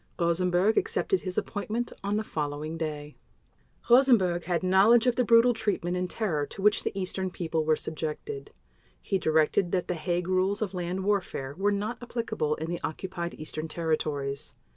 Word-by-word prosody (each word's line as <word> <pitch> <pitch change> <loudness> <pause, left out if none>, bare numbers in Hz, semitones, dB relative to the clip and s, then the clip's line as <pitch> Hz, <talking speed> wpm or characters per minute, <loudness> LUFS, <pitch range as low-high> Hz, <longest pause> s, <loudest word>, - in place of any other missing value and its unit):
Rosenberg 180 +4 +2
accepted 385 -3 0
his 185 -1 -5
appointment 220 +3 -2
on 200 +1 0
the 215 - -1
following 150 -2 -3
day. 150 -2 -5 0.7
Rosenberg 235 -9 +4
had 175 0 0
knowledge 200 +6 +5
of 250 -1 +3
the 250 - +2
brutal 235 +1 +5
treatment 205 -6 -1
and 180 0 -2
terror 175 -11 -1
to - - -8
which 210 0 +4
the 200 - -2
Eastern 190 0 -2
people 165 -3 -2
were 155 0 +4
subjected. 150 -3 -5 0.5
He 195 - -1
directed 160 +3 +2
that 180 -2 0
the - - 0
Hague 175 +1 -2
Rules 190 +3 +1
of 200 - -4
Land 180 +1 -3
Warfare 185 -9 -1
were 200 +3 +1
not 210 +4 -3
applicable 230 -10 -2
in 160 - -5
the 175 0 -4
Occupied 175 +1 -4
Eastern 155 +1 -5
Territories. 155 -4 -2
180 Hz, 165 wpm, -28 LUFS, 160-205 Hz, 0.7 s, knowledge